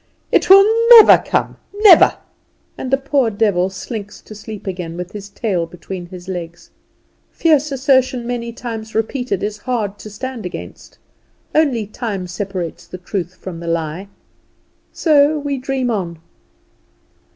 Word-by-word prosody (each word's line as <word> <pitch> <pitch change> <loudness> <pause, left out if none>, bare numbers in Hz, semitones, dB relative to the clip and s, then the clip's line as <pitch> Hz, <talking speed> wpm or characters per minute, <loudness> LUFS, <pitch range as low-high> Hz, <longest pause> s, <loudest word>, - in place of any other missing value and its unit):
"It - - +2
will 390 +1 +9 0.3
never 440 - +8
come - - -1 0.2
never," 410 -5 +6 0.6
and 260 - -6
the 270 - +3
poor 275 -3 +1
devil 200 -4 +1
slinks 200 +2 -7
to - - -12
sleep 215 0 -9
again, 180 -3 -5
with 180 +1 -6
his 205 -1 -9
tail 190 -6 -2
between 175 +1 -8
his 180 0 -11
legs. 170 -2 -7 0.6
Fierce 305 -3 +1
assertion 260 -2 +1
many 235 -1 -4
times 225 -2 -7
repeated 225 -2 -2
is 210 0 -3
hard 210 -5 -3
to 215 - -9
stand 245 +3 -6
against; 180 - -9 0.6
only 275 -8 +2
time 205 -3 -5
separates 180 -2 -5
the 185 - -8
truth 180 -1 -5
from 180 -3 -8
the 170 - -8
lie. 165 +3 -3 0.8
So 300 -1 +3
we 285 -2 -3
dream 260 -1 -2
on. 175 -6 -3
210 Hz, 140 wpm, -18 LUFS, 180-260 Hz, 0.8 s, will